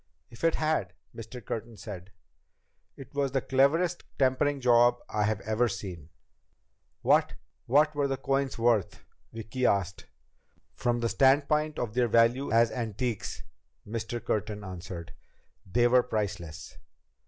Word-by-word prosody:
"If 115 - -14
it 165 -1 +3
had," 155 0 0 0.2
Mr. 115 +1 -9
Curtin 115 0 -5
said, 95 -3 -8 0.9
"it 135 - -12
was 140 -2 -1
the 135 - +1
cleverest 160 +8 +2
tampering 140 +2 +2
job 120 -1 +5
I've 105 0 0
ever 110 +3 +1
seen." 85 -9 -6 0.9
"What - - +3 0.3
what 150 +5 +4
were 145 -1 0
the 135 -1 -2
coins 135 0 -1
worth?" 115 -4 +1 0.3
Vicki 115 +3 -5
asked. 95 -2 -1 0.7
"From 120 -1 -1
the 115 - +1
standpoint 150 +4 +3
of 115 -3 -3
their 125 0 +2
value 115 +4 +3
as 115 0 +4
antiques," 115 -1 -3 0.4
Mr. 115 +2 -4
Curtin 105 -1 -2
answered, 90 -2 -8 0.6
"they 120 +2 +4
were 125 +1 +5
priceless. 95 -9 -4
120 Hz, 130 wpm, -28 LUFS, 105-135 Hz, 0.9 s, job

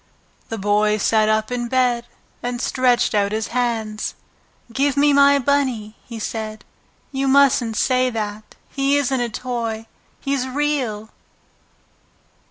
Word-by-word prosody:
The 225 - -4
Boy 210 +1 +2
sat 215 +1 +2
up 215 +1 +1
in 240 -1 -2
bed 245 -1 +1 0.3
and 245 0 -3
stretched 250 -1 +2
out 200 -1 +2
his 215 0 -2
hands. 225 -3 -2 0.6
"Give 280 +2 +1
me 290 0 +4
my 280 0 +6
Bunny!" 260 -6 0
he 235 - -9
said. 215 0 -5 0.5
"You 270 0 -1
mustn't 265 -5 +4
say 255 -1 +2
that. 215 -2 -5
He 275 +1 +1
isn't 270 -2 0
a 240 - -1
toy. 230 -2 -4 0.3
He's 275 -2 -1
REAL!" 255 -6 -2
240 Hz, 130 wpm, -21 LUFS, 215-270 Hz, 0.6 s, my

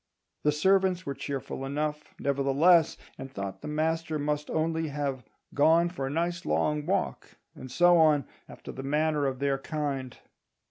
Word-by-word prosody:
The 150 - +3
servants 185 +3 +2
were 140 - -2
cheerful 135 -1 -5
enough, 150 +2 -2
nevertheless, 140 +5 +3 0.2
and 135 0 -7
thought 100 -3 -6
the - - -7
master 160 +1 -1
must 150 0 -2
only 160 0 0
have 140 -3 -3 0.3
"gone 165 +4 +4
for 155 -7 -4
a - - -3
nice 170 +3 -1
long 150 -3 0
walk," 190 0 -2 0.2
and 130 - -10
so 175 +5 +5
on, 150 -4 +4 0.2
after - - -9
the 135 - -7
manner 150 +1 +1
of 130 -1 -2
their 140 0 0
kind. 135 -4 -4
150 Hz, 155 wpm, -28 LUFS, 140-165 Hz, 0.3 s, so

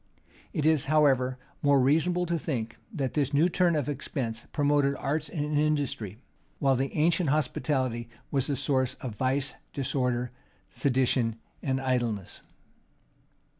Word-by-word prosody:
It 150 - -1
is, 155 -3 +3
however, 135 -4 +3 0.2
more 140 -1 +4
reasonable 165 +7 +3
to 170 -1 -1
think, 120 -8 -3 0.2
that 140 - -2
this 145 -1 0
new 155 +5 +5
turn 175 -1 +2
of 145 -3 0
expense 130 -5 -3
promoted 145 -1 +2
arts 150 +2 -2
and 150 -1 -1
industry; 140 -9 0 0.4
while 135 -1 +3
the 135 +2 -1
ancient 165 +1 +3
hospitality 130 -5 0 0.2
was 135 -3 +2
the 145 - 0
source 130 -2 +1
of 125 -4 -6
vice, 135 +4 0 0.2
disorder, 125 -3 -1 0.4
sedition, 125 -4 +1 0.3
and 135 -1 0
idleness. 120 -7 -1
140 Hz, 130 wpm, -28 LUFS, 130-150 Hz, 0.4 s, new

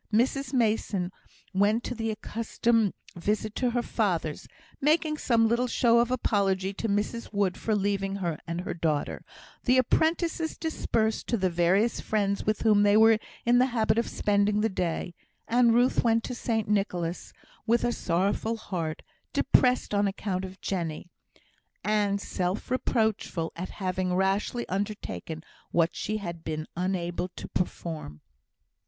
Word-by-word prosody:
Mrs 250 +4 +1
Mason 215 -7 +1 0.4
went 205 +5 +2
the 225 -1 -2
accustomed 225 0 0 0.2
visit 210 +4 -1
to 250 - +1
her 240 0 0
father's, 175 -11 -1 0.3
making 305 +1 +2
some 230 -2 +3
little 235 +2 +1
show 235 -1 +4
of 240 0 +2
apology 195 -6 +1
to 225 +3 -3
Mrs 210 +3 -1
Wood 200 -3 +1
for 220 - -1
leaving 195 -1 0
her 170 -6 -2
and 170 +1 -2
her - - -4
daughter; 160 -3 -1 0.4
the 255 +1 +4
apprentices 320 +5 +1
dispersed 225 -9 -1
to 235 - +1
the 185 -2 +1
various 185 +7 +2
friends 200 -2 0
with 215 -1 +1
whom 210 -2 +5
they 205 0 +5
were 220 0 +6 0.3
in 240 +1 +5
the 255 - +4
habit 225 -3 +1
of 235 - -1
spending 205 0 +2
the 220 - +2
day; 175 -2 -2 0.3
and 235 -1 +4
Ruth 245 +2 +3
went 230 -1 +3
to 250 - -4
St 225 -3 -1
Nicholas', 180 -4 -1 0.4
with 235 +1 +3
a 240 - +2
sorrowful 200 +4 0
heart, 165 -7 -4 0.3
depressed 250 -4 +3
on 205 0 +3
account 195 -1 -2
of 190 0 -8
Jenny, 175 -2 -3 0.7
and 205 -1 +1
self 185 +3 -3
reproachful 220 -9 0
at 180 +2 -5
having 185 -1 -2
rashly 195 +5 0
undertaken 185 - -4 0.3
what 165 -1 +2
she 215 +1 -2
had 170 -5 -6
been 155 -1 -3
unable 180 -1 -1
to - - -7
perform. 160 - -4
205 Hz, 150 wpm, -28 LUFS, 185-230 Hz, 0.7 s, were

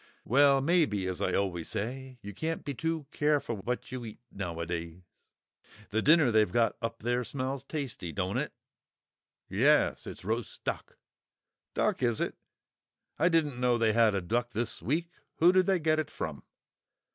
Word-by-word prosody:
"Well, 140 +2 +5
maybe; 145 - +2
as 95 -1 -3
I - - +1
always 90 -4 -1
say, 130 +4 -4
you 100 +1 -7
can't 160 - -3
be 140 - -2
too 160 +3 -2
careful 145 -6 +1
what 125 +6 -4
you 130 -1 -5
eat 110 -2 -9
nowadays. 85 -1 -4 0.9
The 110 +2 +1
dinner 150 -3 +5
they've 110 -4 +3
got 115 +2 +2
up 115 -1 -4
there 120 +1 +1
smells 130 +1 -3
tasty, 135 - -4
don't 95 +2 -1
it?" - - -3 1.0
"Yes; - - +3
it's - - -8
roast 110 +2 -3
duck." - - -4 0.8
"Duck, - - +1
is 120 -3 +2
it? - - -1 0.8
I 170 - +4
didn't 150 -7 +1
know 125 -1 +3
they'd 115 -2 +2
had 115 -2 +4
a 95 - 0
duck 120 +6 -1
this 115 +2 -2
week. 165 +6 -1 0.2
Who 170 +2 +6
did 185 -1 +3
they 190 -1 +4
get 155 -1 +2
it 155 - -2
from?" - - -5
120 Hz, 165 wpm, -30 LUFS, 105-145 Hz, 1.0 s, Who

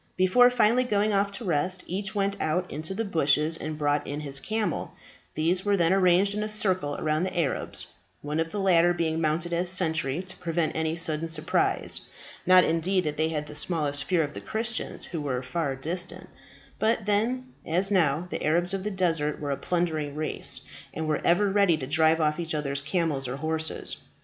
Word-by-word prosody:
Before 185 +7 +6
finally 245 0 +3
going 210 -3 +1
off 200 0 +2
to 220 +3 -6
rest, 180 +2 0
each 195 +3 -4
went 200 0 +1
out 180 +4 0
into 155 +6 -4
the 225 +2 -1
bushes 155 -3 +2
and 155 -1 -5
brought 145 -1 0
in 145 +1 -4
his 140 -2 -3
camel; 220 +7 -2 0.4
these 175 +4 +1
were 205 -1 +2
then 170 0 +3
arranged 190 +1 +4
in 210 - -2
a 215 - -2
circle 185 -9 0
around 155 0 0
the 185 - -3
Arabs, 150 -5 -2 0.4
one 150 +2 -2
of 165 0 0
the 205 - -3
latter 175 -2 +4
being 160 -1 0
mounted 165 +2 0
as 175 +1 0
sentry 160 -3 0
to 185 0 -9
prevent 170 -2 -1
any 160 0 0
sudden 165 -1 -2
surprise 155 -1 0 0.4
not 185 0 +8
indeed 180 +3 +1
that 150 -1 -2
they 155 +1 +1
had 150 -2 -2
the 150 - -10
smallest 145 -3 -2
fear 175 -1 +2
of 145 0 -5
the - - -7
Christians, 225 +1 -3
who 165 -4 -5
were 130 -3 -2
far 140 +1 -2
distant; 170 +7 -5 0.5
but 220 -1 +1
then, 245 +5 0
as 185 +5 0
now, 170 -3 +2
the - - -3
Arabs 175 +4 +2
of 195 -1 -2
the 210 - -1
desert 165 -6 0
were 145 -1 -3
a - - +1
plundering 155 -4 -1
race, 155 0 -3 0.3
and 160 0 -2
were 155 -1 0
ever 175 +4 +4
ready 195 -4 +3
to 135 - -5
drive 160 +3 +3
off 150 0 +1
each 165 -2 -2
other's 140 -2 -2
camels 150 -4 -1
or 125 - -3
horses. 160 +1 -2
165 Hz, 200 wpm, -27 LUFS, 155-190 Hz, 0.5 s, not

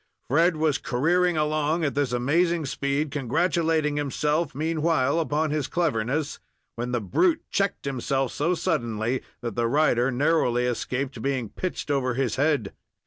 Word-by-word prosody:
Fred 165 +4 +4
was 155 -2 +1
careering 170 +7 +1
along 155 +2 +1
at 140 - 0
this 140 -3 0
amazing 160 +7 +1
speed, 140 +2 -1
congratulating 160 +2 +1
himself 150 +3 -1
meanwhile 160 -1 +1
upon 155 -1 0
his 150 -3 -1
cleverness, 145 -3 -1 0.4
when 120 +1 -3
the 120 - +1
brute 315 - +1
checked 200 -5 -1
himself 135 -1 -1
so 170 +5 0
suddenly 120 - -1 0.2
that 120 -3 -4
the 120 -1 +1
rider 125 -2 +3
narrowly 125 -2 +2
escaped 125 +2 -2
being 130 -5 -1
pitched 185 -5 -4
over 130 -3 0
his 130 -3 -1
head. 145 -7 +1
145 Hz, 140 wpm, -25 LUFS, 125-160 Hz, 0.4 s, Fred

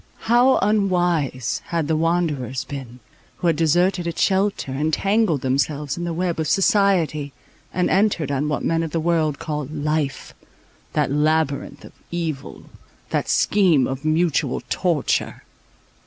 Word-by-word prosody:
How 245 +3 +4
unwise 175 - +1
had 165 -3 -2
the 160 - +1
wanderers 155 -6 0
been, 130 -3 -8 0.3
who - - -6
had 165 -2 +3
deserted 175 +3 +2
its 170 - -4
shelter, 195 -7 +1
entangled 160 - +1
themselves 140 +2 -1
in 175 - -4
the 170 - -2
web 170 0 -2
of 160 - -1
society, 185 - +2 0.4
and 180 0 0
entered 190 -7 +1
on 140 +2 -1
what 150 - -2
men 165 0 +1
of 165 - -2
the 165 - -2
world 160 -3 +1
call 150 -3 -4
"life,"—that 150 -3 -4
labyrinth 150 0 0
of - - -14 0.2
evil, 165 -5 -4 0.5
that - - -1
scheme 180 -10 +3
of 135 +2 -4
mutual 155 -3 +1
torture. 170 -6 0
160 Hz, 135 wpm, -22 LUFS, 145-175 Hz, 0.5 s, How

